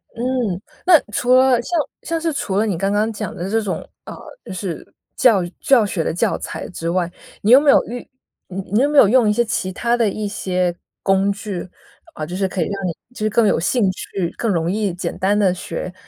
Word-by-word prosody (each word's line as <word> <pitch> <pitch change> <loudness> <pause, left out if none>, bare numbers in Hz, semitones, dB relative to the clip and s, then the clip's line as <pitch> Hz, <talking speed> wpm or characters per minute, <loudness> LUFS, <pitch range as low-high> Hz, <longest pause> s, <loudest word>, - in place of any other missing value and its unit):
嗯， - - -11 0.7
那 345 -4 +8
除 245 +4 +2
了 255 -2 +5
像 340 +7 -1 0.2
像 330 -1 -2
是 325 -1 -1
除 195 -8 -2
了 215 - +3
你 200 -6 -1
刚 195 +3 0
刚 210 +2 +1
讲 210 -3 -5
的 180 +3 -4
这 225 +2 +1
种， 200 -3 -4 0.2
呃， - - -8 0.3
就 - - -9
是 185 -3 -5 0.3
教 215 -7 +4 0.2
教 250 -5 +4
学 190 -4 -2
的 - - -1
教 175 - 0
材 - - -6
之 165 -2 -4
外， 175 0 0 0.3
你 210 - +2
有 260 - +10
没 290 0 +2
有 - - +6
玉 245 +1 -7 0.4
你 195 +3 -2
有 280 +3 +3
没 295 - 0
有 235 - +8
用 235 0 +4
一 - - +3
些 240 +3 +2
其 190 -4 -2
他 235 +5 0
的 230 -3 +2
一 210 +1 -3
些 180 -3 -1 0.3
工 195 +1 +3
具？ 200 -2 -5 0.6
呃， 155 - -4
就 175 +4 -6
是 195 +1 0
可 185 -1 -3
以 - - +4
让 195 -2 -3
你 - - -1 0.2
就 - - -11
是 215 0 +1
更 220 +1 +3
有 - - +2
兴 215 +8 +1
趣， 185 -1 -4
更 230 - -1
容 165 -2 0
易 205 -1 0
简 180 - -4
单 200 +2 +2
地 195 -3 +3
学。 180 0 -6
205 Hz, 245 characters per minute, -20 LUFS, 185-235 Hz, 0.7 s, 有